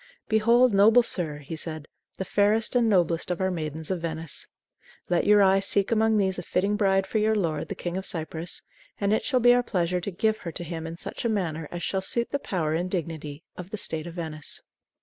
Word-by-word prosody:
"Behold, 230 +2 +4
noble 220 +5 +6
sir," 165 -9 -1
he 150 +2 -7
said, 155 -1 -5 0.3
"the 190 - -3
fairest 210 +4 +2
and 235 -2 +4
noblest 175 -4 +2
of 180 - -2
our 190 0 +1
maidens 160 -1 -4
of 180 -3 -2
Venice. 160 -1 -4 0.6
Let 175 -1 +1
your 205 -1 +6
eye 195 0 +5
seek 200 +1 +2
among 220 -1 +3
these 190 -2 +1
a - - -3
fitting 200 +3 0
bride 195 -2 +2
for 220 - -1
your 220 +1 +2
lord, 165 -7 -1
the - - -5
King 175 +1 -4
of 190 - -3
Cyprus, 165 0 -3 0.4
and 200 +1 +1
it 220 - +1
shall 260 -3 +1
be 245 0 +6
our 245 - +4
pleasure 180 -5 -1
to 190 - -3
give 215 +4 0
her 170 - -6
to 175 - -4
him 165 -1 -5
in 165 +1 -7
such - - -6
a 235 - +1
manner 165 -7 -2
as 175 0 -6
shall 190 - -1
suit 235 +5 0
the 280 - 0
power 165 - -2
and 175 +3 -1
dignity 160 -4 -4
of 180 0 -8
the 215 - -5
State 160 -4 -4
of 170 - -8
Venice." 155 -3 -4
185 Hz, 230 wpm, -26 LUFS, 165-210 Hz, 0.6 s, noble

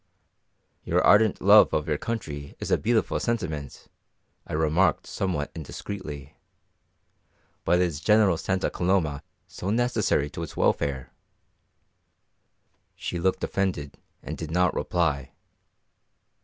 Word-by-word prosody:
"Your - - +1
ardent 105 0 +5
love 105 +2 +6
of 75 - -1
your 75 -2 -1
country 75 -12 -5
is - - -5
a - - +4
beautiful 115 +1 +1
sentiment," 80 - -4 0.6
I - - -7
remarked 80 +4 +2
somewhat 85 -7 -2
indiscreetly, 80 -2 -7 1.3
"but 90 - +3
is 85 -5 0
General 105 -1 +4
Santa 95 +3 -1
Coloma 85 -6 0 0.2
so 95 - -6
necessary 120 -10 +1
to - - -6
its 80 - -7
welfare?" 70 -3 0 1.8
She 85 - -4
looked 95 +2 0
offended 90 -8 -2 0.2
and - - -6
did 80 - -5
not 90 +2 +2
reply. 75 -7 -1
85 Hz, 115 wpm, -26 LUFS, 75-100 Hz, 1.8 s, love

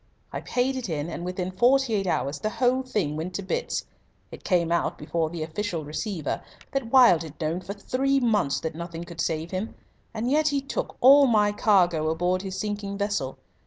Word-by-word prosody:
I - - -3
paid 255 +2 0
it 245 -6 -4
in, 155 +1 -3
and 170 - -5
within 180 +1 -3
forty 245 +5 +3
eight 195 -2 0
hours 140 -2 -1
the 215 - -1
whole 250 +3 +1
thing 210 - -2
went 170 +4 -4
to 200 - -3
bits. 480 - -2 0.5
It - - -10
came 170 -3 +1
out 170 - 0
before 160 +1 -1
the 165 -1 -4
Official 165 0 -3
Receiver 160 +1 -3 0.3
that 270 -4 -2
Wilde 245 -11 +7
had 160 -2 -9
known 165 +2 -1
for 195 +2 -6
three 270 +6 0
months 215 - +1
that 160 - -3
nothing 170 +1 -6
could 170 -1 -6
save 160 0 -2
him. 190 +4 -4 0.4
And 230 +1 -3
yet 305 +1 +3
he 285 -2 +2
took 275 0 -4
all 275 +2 +8
my 210 -3 +3
cargo 175 -7 +3
aboard 175 +3 0
his 190 -1 -5
sinking 205 -1 -3
vessel. 200 -10 -2
190 Hz, 200 wpm, -26 LUFS, 165-235 Hz, 0.5 s, all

